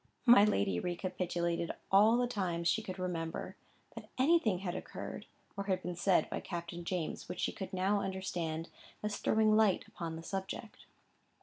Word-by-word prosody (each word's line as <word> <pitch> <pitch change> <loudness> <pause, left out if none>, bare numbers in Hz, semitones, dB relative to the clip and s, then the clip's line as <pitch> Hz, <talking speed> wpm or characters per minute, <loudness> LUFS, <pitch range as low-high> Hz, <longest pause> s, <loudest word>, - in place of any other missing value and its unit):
My 240 -4 +9
lady 100 - +2
recapitulated 175 -1 -1 0.2
all 210 +4 +6
the 245 - +2
times 180 -8 -1
she 220 - +2
could 185 -3 -6
remember, 170 -3 -3 0.4
that - - -10
anything 260 - +4
had 180 -1 -3
occurred, 185 - -6 0.3
or 200 0 -3
been 180 0 -5
said 180 +1 +3
by - - -3
Captain 170 -1 -5
James 170 -2 -3
which 180 - -5
she - - +1
could 190 -1 -6
now 195 +2 +1
understand 175 -4 -3 0.3
as 210 -1 -1
throwing 215 -1 +3
light 215 -3 +3
upon 165 -2 -5
the 165 - -7
subject. 195 +4 -6
185 Hz, 160 wpm, -33 LUFS, 170-205 Hz, 0.4 s, My